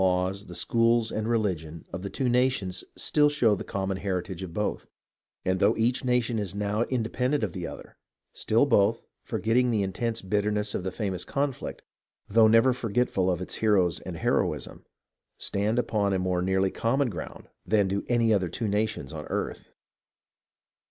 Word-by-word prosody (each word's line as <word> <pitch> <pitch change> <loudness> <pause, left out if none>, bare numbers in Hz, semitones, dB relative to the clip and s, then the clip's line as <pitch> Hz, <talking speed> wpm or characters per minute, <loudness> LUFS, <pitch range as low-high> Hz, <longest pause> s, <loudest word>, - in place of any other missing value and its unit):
laws, 95 +2 +1
the 90 - -8
schools 115 +3 +2
and 110 0 -2
religion, 90 -9 -1
of 90 - -4
the 100 - -4
two 130 - -1
nations 120 -7 +1
still 150 -1 +3
show 125 -7 +3
the - - -3
com 95 -1 -3
mon 95 - -1
heritage 95 -1 -3
of 95 -3 -6
both; 105 +4 -2 0.6
and 95 0 +1
though 105 +3 +3
each 120 +4 +1
nation 125 -2 +1
is 100 -2 -3
now 105 +1 -1
independent 125 +2 0
of 100 -6 -2
the 90 -3 -4
other, - - -10 0.4
still 115 +5 +2
both, 110 -4 +2 0.2
forgetting 125 +3 +1
the 110 -4 +1
intense 115 +4 -2
bitterness 105 +1 0
of - - -2
the 95 - -2
famous 95 -5 -3
conflict, 140 -2 -3 0.4
though 110 +1 +5
never 115 +4 +5
forgetful 115 -5 0
of 90 -1 0
its 90 - -4
heroes 100 -6 +2
and - - -7
heroism, - - -1 0.5
stand 105 +3 0
upon 105 -5 +1
a - - +2
more 90 -1 0
nearly 95 +1 +1
common 135 +4 +1
ground 85 -4 -8 0.2
than 105 -2 +2
do 100 +1 -1
any 115 -2 +3
other 95 -4 +1
two 115 - -3
nations 105 -9 -1
on 75 -2 -6
earth. - - -4
105 Hz, 170 wpm, -27 LUFS, 95-115 Hz, 0.6 s, though